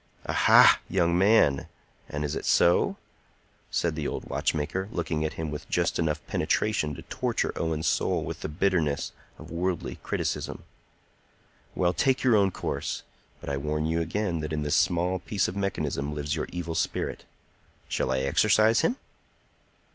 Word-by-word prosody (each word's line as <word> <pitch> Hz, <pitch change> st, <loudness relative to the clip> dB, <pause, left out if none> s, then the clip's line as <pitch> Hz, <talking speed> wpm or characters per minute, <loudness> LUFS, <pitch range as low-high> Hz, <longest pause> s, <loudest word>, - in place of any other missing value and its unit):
"Aha, -, -, +6 dB
young 85 Hz, -2 st, +2 dB
man! 95 Hz, -7 st, +4 dB, 0.4 s
And 75 Hz, +1 st, -3 dB
is 75 Hz, -, -3 dB
it -, -, -4 dB
so?" 85 Hz, -, +3 dB, 0.7 s
said 85 Hz, -2 st, 0 dB
the 75 Hz, -2 st, -3 dB
old -, -, -5 dB
watchmaker, 85 Hz, +6 st, -1 dB
looking 80 Hz, -5 st, -2 dB
at 80 Hz, -, -2 dB
him 80 Hz, -2 st, -4 dB
with 75 Hz, -, -7 dB
just -, -, 0 dB
enough 80 Hz, -2 st, -1 dB
penetration 85 Hz, -9 st, 0 dB
to -, -, -10 dB
torture -, -, -2 dB
Owen's 80 Hz, -1 st, -2 dB
soul -, -, +1 dB
with -, -, -5 dB
the -, -, -4 dB
bitterness 80 Hz, -3 st, 0 dB, 0.3 s
of 80 Hz, +1 st, -12 dB
worldly 90 Hz, +1 st, -2 dB
criticism. -, -, -3 dB, 1.1 s
"Well, 90 Hz, -1 st, +2 dB
take 130 Hz, +3 st, +1 dB
your 125 Hz, -3 st, +5 dB
own 100 Hz, -2 st, +4 dB
course; -, -, -4 dB, 0.4 s
but -, -, -11 dB
I 70 Hz, -, -1 dB
warn 75 Hz, +2 st, -1 dB
you 80 Hz, +1 st, 0 dB
again 85 Hz, +1 st, -1 dB
that 75 Hz, 0 st, -4 dB
in 75 Hz, -1 st, -1 dB
this 75 Hz, +2 st, +1 dB
small 90 Hz, +1 st, +2 dB
piece 100 Hz, +2 st, -1 dB
of 90 Hz, -, -5 dB
mechanism 75 Hz, -7 st, -2 dB
lives 75 Hz, +1 st, -2 dB
your 80 Hz, -, -3 dB
evil 85 Hz, -2 st, -4 dB
spirit. -, -, -2 dB, 0.6 s
Shall 65 Hz, -, -1 dB
I 65 Hz, 0 st, +1 dB
exorcise 105 Hz, +10 st, +4 dB
him?" 165 Hz, +10 st, +1 dB
85 Hz, 160 wpm, -27 LUFS, 75-95 Hz, 1.1 s, Aha